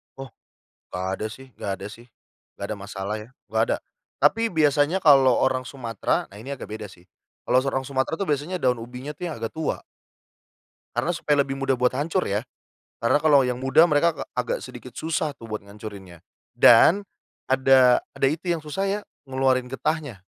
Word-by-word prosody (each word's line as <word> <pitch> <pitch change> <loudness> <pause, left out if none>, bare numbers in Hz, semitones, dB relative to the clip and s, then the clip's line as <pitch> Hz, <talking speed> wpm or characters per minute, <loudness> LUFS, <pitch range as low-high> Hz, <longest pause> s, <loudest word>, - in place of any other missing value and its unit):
Oh 135 -2 -8 0.6
gak 90 +1 -3
ada - - -4
sih 135 +3 -11
gak 100 - -3
ada 100 - -5
sih, 120 +2 -13 0.5
gak 100 - -3
ada 110 - -2
masalah 100 +1 -5
ya, 105 +3 -10 0.2
gak 110 +1 +1
ada. - - -1 0.4
Tapi 225 +10 +3
biasanya 150 +2 +3
kalau 135 -4 +6
orang 130 -1 +1
Sumatera 115 -6 -2
nah 100 - -13
ini 135 +6 -6
agak 130 - -9
beda 110 0 -6
sih, 90 -1 -19 0.4
kalau - - +4
seorang 135 -1 -2
Sumatera 130 +1 -1
tuh 195 - -2
biasanya 150 +6 -1
daun 125 -1 +2
ubinya 125 +5 -7
tuh 180 - -10
yang - - -5
agak 115 0 -3
tua. 160 -1 -2 1.2
Karena 175 - +1
supaya 150 -4 +1
lebih 135 0 -5
mudah 135 -1 +1
buat 125 0 +2
hancur 165 +6 0
ya. 100 +3 -1 0.6
Karena 115 +5 +3
kalau 145 -4 +5
yang 125 0 -2
muda 135 +5 +5
mereka 165 +1 +2
gak - - -7
agak - - -1
sedikit - - -10
susah 155 -2 -2
tuh - - -13
buat 110 -1 -4
ngancurinnya 100 -4 -11 0.3
dan 170 - +7 0.4
ada 130 -1 +5 0.2
ada 135 - +2
itu 160 +5 -2
yang 165 -2 -1
susah 175 +7 -2
ya 205 +2 -1 0.3
ngeluarin 130 -1 +1
getahnya, 135 - -3
135 Hz, 185 wpm, -24 LUFS, 115-150 Hz, 1.2 s, dan